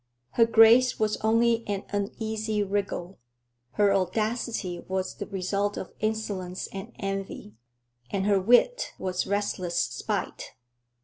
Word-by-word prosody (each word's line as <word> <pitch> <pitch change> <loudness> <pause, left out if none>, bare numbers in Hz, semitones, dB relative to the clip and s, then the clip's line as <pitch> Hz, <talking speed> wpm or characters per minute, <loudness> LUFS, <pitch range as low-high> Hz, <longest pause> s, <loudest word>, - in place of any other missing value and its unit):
Her 230 - +4
grace 230 +3 +6
was 215 -1 +1
only 230 +1 +2
an 200 -1 -2
uneasy 215 +1 -2
wriggle, 195 -2 -3 0.5
her 205 -1 +3
audacity 205 -1 -1
was 190 0 -2
the 205 - -7
result 200 +1 -1
of - - -6
insolence 205 -4 -2
and 195 +4 -7
envy, 195 - -5 0.6
and 195 -1 -1
her 200 -2 +3
wit 365 - +3
was 185 -1 -2
restless 190 -4 -1
spite. - - -3
205 Hz, 120 wpm, -27 LUFS, 190-220 Hz, 0.6 s, grace